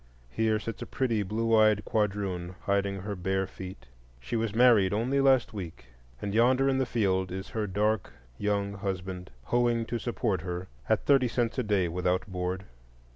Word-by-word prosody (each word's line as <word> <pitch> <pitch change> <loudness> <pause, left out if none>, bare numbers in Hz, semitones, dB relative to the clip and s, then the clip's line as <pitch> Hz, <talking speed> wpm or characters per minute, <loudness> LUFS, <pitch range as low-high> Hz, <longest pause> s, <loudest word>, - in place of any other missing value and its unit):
Here 110 - +1
sits 110 +1 -6
a - - -5
pretty 115 -5 0
blue 115 +3 +1
eyed 110 -1 +4
quadroon 100 -4 -1
hiding 100 0 0
her 100 +1 -4
bare 95 +1 -1
feet; 95 -5 -9 0.3
she - - -5
was 110 -2 -1
married 115 -6 +5
only 125 +6 +1
last 130 -4 +3
week, 85 - -8 0.3
and 100 -1 -4
yonder 130 +4 +4
in 135 -1 +2
the 130 - +1
field 95 -6 0
is 95 +1 -5
her 110 -2 -2
dark 105 +1 0 0.3
young 100 -1 0
husband, 95 -2 -4
hoeing 120 - +1
to 120 +1 -3
support 115 -6 -1
her, 90 +1 -5 0.2
at - - +2
thirty 135 -3 +4
cents 120 +1 -1
a - - +1
day 100 -4 +1
without 90 +2 0
board. 95 0 -3
105 Hz, 175 wpm, -29 LUFS, 95-115 Hz, 0.3 s, married